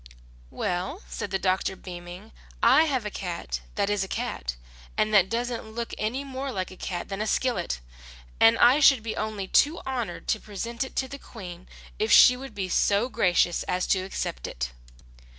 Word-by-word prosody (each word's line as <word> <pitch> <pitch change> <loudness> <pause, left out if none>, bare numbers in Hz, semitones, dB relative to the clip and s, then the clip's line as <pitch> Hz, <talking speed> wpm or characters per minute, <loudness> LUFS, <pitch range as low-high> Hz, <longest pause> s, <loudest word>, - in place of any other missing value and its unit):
"Well," 185 - -3
said - - -5
the 195 - 0
doctor, 190 0 0
beaming, 180 +3 -9 0.3
"I 270 +7 +7
have 260 -7 -1
a 210 - -3
cat 170 - -4
that - - +1
is 205 -1 +1
a - - -5
cat - - -3 0.4
and 215 0 +1
that 190 -3 +5
doesn't 240 +1 -2
look 235 0 -4
any 240 +6 -2
more 270 0 -5
like 185 -5 -3
a - - -10
cat 180 -1 -4
than 195 +1 -4
a 215 - -1
skillet, 240 - 0 0.6
and 225 +1 +6
I 250 +5 +6
should 270 -5 +6
be 225 - -3
only 215 -3 -3
too 300 - +4
honoured 255 -4 -4
to 220 - +2
present 230 +5 -4
it 265 - -9
to 265 - 0
the 280 +1 -8
Queen 180 -8 -10 0.3
if 215 +1 +1
she 250 - +9
would 260 -3 -9
be 195 -2 -2
so 205 +6 +2
gracious 180 -6 +2
as 180 0 0
to 190 - 0
accept 185 - -4
it." - - -4
215 Hz, 185 wpm, -26 LUFS, 185-245 Hz, 0.6 s, she